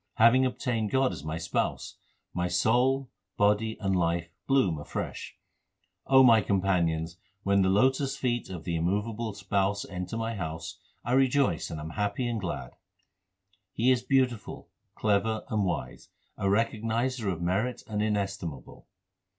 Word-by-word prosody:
Having 125 +4 +5
obtained 115 -4 -2
God 130 0 +2
as 75 -6 -7
my 80 +1 -3
Spouse, - - -2 0.4
my 90 0 0
soul, 125 +9 +2 0.3
body, 105 +2 +2
and 95 -2 0
life 85 -1 0 0.2
bloom 105 - +2
afresh. 75 - -6 0.7
my 130 -4 +7
companions, 90 -4 0 0.3
when 100 0 +3
the 95 - +3
lotus 130 +7 +2
feet 120 -3 -1
of 90 -4 -7
the 85 -2 -2
immovable 105 +6 -1
Spouse 100 0 0
enter 90 +4 -5
my 115 0 -2
house, 80 -2 -5 0.3
I 120 - -2
rejoice 130 - +2
and 80 - -5
am 80 +1 -6
happy 105 +6 -1
and 115 -3 -2
glad. 90 - -4 1.0
He 125 +3 +3
is 125 -2 +2
beautiful, 125 -3 0 0.3
clever, 110 +1 +1
and 105 -2 +1
wise, 90 - -4 0.3
a - - -4
Recognizer 115 +2 0
of 85 - -4
merit 95 +8 -1
and 105 -1 -2
inestimable. 100 - -3
105 Hz, 140 wpm, -28 LUFS, 90-120 Hz, 1.0 s, my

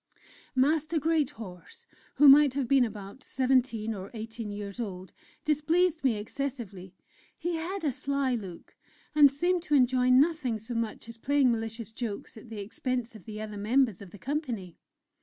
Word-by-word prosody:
Master 310 +4 +2
Greathorse, 275 - -3 0.3
who 290 +2 +6
might 280 -1 +8
have 275 -3 0
been 270 0 +5
about 210 +2 -6
seventeen 250 -4 +1
or 195 -1 -7
eighteen 225 0 -6
years 205 +1 -6
old, 185 -5 -6 0.3
displeased 315 +2 +2
me 255 -4 +3
excessively; 210 -5 -5 0.4
he 345 +1 -2
had 365 +4 -4
a 295 - +2
sly 275 0 -1
look, 190 -7 -7 0.4
and 295 -2 +8
seemed 350 +6 0
to 300 -3 0
enjoy 255 -1 +3
nothing 265 -2 +3
so 220 +3 -7
much 230 -1 -3
as 230 0 -9
playing 275 0 +3
malicious 225 -1 -4
jokes 220 -3 -5
at 220 +1 -12
the 225 - -7
expense 240 +3 -3
of 210 - -13
the 215 -1 -7
other 215 -1 -6
members 225 0 +2
of 200 - -10
the 205 - -12
company. 240 - -4
245 Hz, 160 wpm, -29 LUFS, 215-285 Hz, 0.4 s, might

